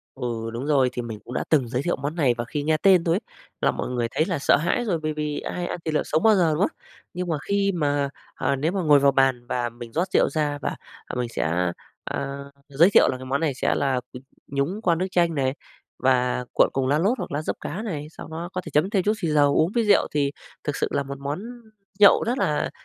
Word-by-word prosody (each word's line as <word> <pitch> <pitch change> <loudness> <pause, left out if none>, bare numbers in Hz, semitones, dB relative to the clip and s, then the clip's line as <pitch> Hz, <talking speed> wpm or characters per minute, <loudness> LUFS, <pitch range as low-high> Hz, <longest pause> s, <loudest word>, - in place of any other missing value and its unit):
Ừ, 115 -3 -4
đúng 125 +5 -4
rồi. 135 -4 +3
Thì 125 - -3
mình 110 -3 -6
cũng 125 - -8
đã - - -1
từng 135 -7 +2
giới 125 +3 -1
thiệu 175 - 0
món 145 +4 -4
này, 135 -8 +2
và 120 - -1
khi 145 +5 -4
nghe 155 +1 +2
tên 185 0 +4
thôi 165 0 +2
ấy 200 - 0 0.4
là - - +3
mọi - - -4
người 120 -2 -1
thấy 155 - +1
là 175 -6 -1
sợ - - +4
hãi 175 +11 0
rồi, 180 -7 0
bởi 155 0 -1
vì 150 -1 -3
ai 175 -1 -4
ăn - - -4
thịt 160 -1 -2
lợn - - +1
sống 155 +2 0
bao 220 -2 +6
giờ, 170 -4 +3
đúng 160 - -2
không? - - 0 0.4
Nhưng 180 0 -3
mà 160 - 0
khi 200 0 +2
mà, 145 -3 0 0.3
à, 140 - 0
nếu 155 +6 0
mà 195 - -1
ngồi 150 -4 +5
vào 140 0 +4
bàn 130 -3 +2
và 120 -1 -1
mình 120 -1 -10
rót 175 +4 0
rượu - - +4
ra, 145 -1 -1
và, - - -2 0.3
à, - - -6
mình 125 -1 -1
sẽ, 90 -3 0 0.3
a, 140 0 -4 0.3
giới 160 +7 +4
thiệu - - +6
là 130 - -1
cái 130 - -9
món 135 +3 -1
này 150 -5 0
sẽ - - 0
là, 130 -3 0
ừm, 125 - -9 0.2
nhúng 140 +10 -2
qua 170 -5 +3
nước 185 +3 -1
chanh 170 -3 +2
này, 135 -1 0 0.4
và 125 -1 +1
cuộn - - +5
cùng 130 -1 0
lá 145 +2 +3
lốt 210 +9 +1
hoặc - - -5
lá 150 +2 -1
giấp - - -3
cá 210 - -5
này. 155 -9 -4
Sau - - -10
đó 165 +2 -5
có 185 - -2
thể - - -9
chấm 155 +7 +2
thêm 195 -3 +2
chút 210 - +2
xì 170 - -1
dầu, 145 -2 +3
uống 160 +4 +3
với 235 -2 +2
rượu 205 -1 +4
thì 140 -1 0 0.3
thực 145 - -2
sự - - 0
là 140 - 0
một 140 0 -7
món 140 +4 -3 0.6
nhậu 200 -1 +7
rất 245 +2 0
là 150 -1 0
150 Hz, 270 wpm, -24 LUFS, 130-170 Hz, 0.6 s, nhậu